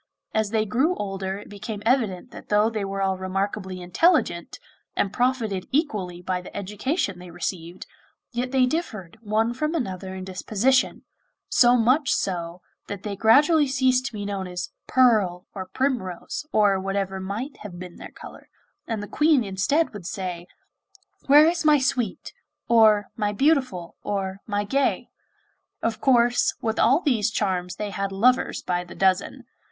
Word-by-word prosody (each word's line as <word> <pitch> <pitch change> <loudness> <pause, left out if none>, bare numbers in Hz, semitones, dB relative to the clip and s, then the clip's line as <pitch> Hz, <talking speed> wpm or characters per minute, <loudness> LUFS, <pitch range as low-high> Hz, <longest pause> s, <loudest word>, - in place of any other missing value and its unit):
As 220 -1 +1
they 220 0 +1
grew 270 - +1
older 195 -1 -4
it 205 - -11
became 205 0 -7
evident 225 -7 +1
that - - -12
though 210 +2 +3
they 215 -2 -2
were 195 0 -2
all 190 -1 0
remarkably 190 0 -3
intelligent, 180 - +1 0.4
and 200 - 0
profited 230 -7 0
equally 205 - -1
by 180 0 -2
the 180 - -10
education 210 - -2
they 180 0 -10
received, 175 0 -5 0.5
yet 245 +1 -2
they 260 -1 +3
differed 220 - -4
one 220 +2 0
from 305 +6 -2
another 190 - -4
in 185 - -6
disposition, 215 +7 0 0.5
so 245 0 +5
much 260 +5 +3
so 175 -1 -2 0.2
that 200 -1 -6
they 205 -2 -4
gradually 290 - +5
ceased 260 -1 +2
to 270 - -8
be 205 -1 -5
known 195 -2 -3
as 180 0 -5 0.2
'Pearl,' 210 -8 +3
or 190 -2 -6
'Primrose,' 245 - -3
or 205 -3 +3
whatever 195 0 -2
might 210 +9 -5
have 195 -4 -9
been 180 -1 -9
their - - -9
colour, - - -13 0.4
and 220 -2 -3
the - - -6
Queen 300 -1 +3
instead 205 - 0
would 195 -5 -8
say: 180 -3 -5 0.8
'Where 295 +2 +8
is 335 +1 +1
my 305 -1 +6
Sweet?' 250 -6 -2 0.3
or 215 -3 +5
'my 210 -2 -1
Beautiful,' 255 - +1
or 195 -1 -3
'my 205 -1 -1
Gay.' 275 +7 0 0.7
Of 225 -1 -1
course, 240 -1 +3
with 220 -1 -2
all 270 +8 +4
these 245 - +1
charms 185 -4 -1
they 210 -1 -4
had 195 0 -3
lovers 245 +6 +2
by 180 -1 -1
the 175 - -12
dozen. 190 0 +1
210 Hz, 160 wpm, -24 LUFS, 190-255 Hz, 0.8 s, Where